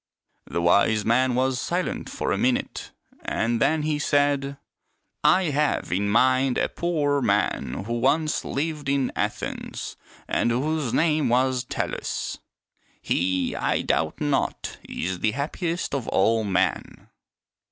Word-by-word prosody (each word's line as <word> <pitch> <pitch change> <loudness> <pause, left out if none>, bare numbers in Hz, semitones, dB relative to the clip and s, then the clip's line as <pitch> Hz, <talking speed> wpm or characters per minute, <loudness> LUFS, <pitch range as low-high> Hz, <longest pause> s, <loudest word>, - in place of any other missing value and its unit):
'^ - - -14
The 85 - 0
wise 100 +4 +3
man 125 +2 +3
was 130 0 +1
silent 180 +1 -2
for - - -2
a - - +1
minute, - - -1 0.3
and 115 +1 -1
then 155 -1 +2
he 150 -1 0
said, 145 -1 +1 0.3
" - - -50 0.2
I 165 - 0
have 145 +1 0
in 100 +3 0
mind 130 +3 +3
a - - +1
poor 145 -5 0
man 100 - 0
who 120 +1 -2
once 150 +5 +1
lived 150 0 -3
in 140 -2 +1
Athens - - -4 0.3
and - - +1
whose 140 +2 0
name 155 -3 +2
was 130 +1 +2
Tellus. - - -3 0.6
He, 90 +1 0
I - - 0
doubt 80 +3 0
not, 145 -2 -1
is 90 +2 -3
the 105 +2 +1
happiest 165 +6 -2
of 135 -5 -2
all 110 +3 +2
men." 95 -1 -1
130 Hz, 140 wpm, -25 LUFS, 110-150 Hz, 0.6 s, wise